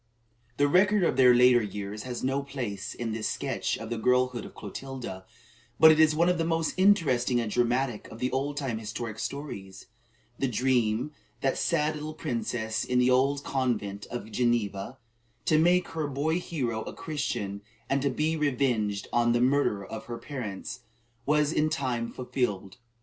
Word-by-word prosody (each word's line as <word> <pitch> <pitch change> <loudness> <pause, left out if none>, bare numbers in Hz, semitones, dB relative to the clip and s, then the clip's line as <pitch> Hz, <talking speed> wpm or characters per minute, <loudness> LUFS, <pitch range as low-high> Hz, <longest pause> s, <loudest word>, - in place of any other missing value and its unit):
The 145 - +4
record 190 +5 +4
of 165 - +2
their 125 -2 +6
later 125 0 +6
years 105 0 -5
has 120 - -4
no 135 +2 +1
place 120 -8 -5
in 115 -2 -3
this 110 0 -2
sketch - - -2
of 115 0 -8
the 115 - -2
girlhood 125 0 +2
of - - -12
Clotilda; 110 -3 -7 0.5
but 160 0 +9
it 155 - +3
is 155 -1 +5
one 170 +2 +3
of 180 -1 +2
the - - +2
most 165 -1 0
interesting 150 -11 +3
and 115 -3 -2
dramatic 120 -1 0
of 110 - -10
the 125 +2 -1
old 140 +2 -2
time 130 -6 -2
historic 110 0 -5
stories. 95 -10 -6 0.5
The 135 - +1
dream 125 +1 +1
of - - -35
that 135 - +1
sad 155 -2 +1
little 155 +1 -6
princess 115 -6 -2
in 125 - 0
the 125 +1 +4
old 140 +2 +2
convent 105 -7 -2
at 120 -2 -5
Geneva, 120 -2 0 0.5
"to 155 - +4
make 175 +2 +3
her 160 -2 -2
boy 150 +5 0
hero 125 -11 -2
a - - -7
Christian, 105 -10 -3 0.3
and 140 0 +1
to 140 - +1
be 155 +5 0
revenged 125 -9 0
on 120 0 +3
the 120 - +2
murderer 125 -6 +2
of 110 +2 -7
her 120 0 -5
parents," 115 -10 -6 0.5
was 150 +1 +3
in 155 +1 +2
time 125 -7 -2
fulfilled. 105 -7 -3
125 Hz, 175 wpm, -28 LUFS, 110-145 Hz, 0.5 s, but